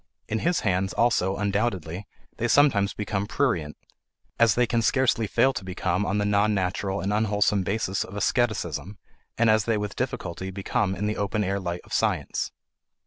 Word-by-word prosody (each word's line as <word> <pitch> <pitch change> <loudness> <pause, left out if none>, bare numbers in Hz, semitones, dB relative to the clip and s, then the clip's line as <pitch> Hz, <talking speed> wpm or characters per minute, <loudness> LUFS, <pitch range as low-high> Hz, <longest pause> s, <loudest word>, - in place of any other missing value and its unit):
In 110 - -1
his 175 +6 +1
hands, 95 -2 0
also, 100 -5 +2
undoubtedly, 100 -3 -2 0.3
they 120 - 0
sometimes 115 -8 +4
become 100 -1 -3
prurient, 90 - -1 0.6
as 115 -2 +5
they 125 - +3
can 120 0 0
scarcely 115 -2 +2
fail 135 +7 +3
to 95 - -5
become 95 +1 -1
on 100 - 0
the 105 - +1
non 105 +1 +2
natural 95 +1 -1
and 100 +2 -1
unwholesome 105 -1 +2
basis 95 0 -1
of 95 - -10
asceticism, 100 - -1 0.4
and 115 - +3
as 110 -1 +4
they 115 -2 +1
with 105 -1 -4
difficulty 95 -8 -4
become 95 +1 -1
in 100 +3 -3
the 105 0 -1
open 100 +1 0
air 100 +1 -1
light 90 -2 -4
of - - -12
science. - - 0
105 Hz, 175 wpm, -26 LUFS, 95-110 Hz, 0.6 s, as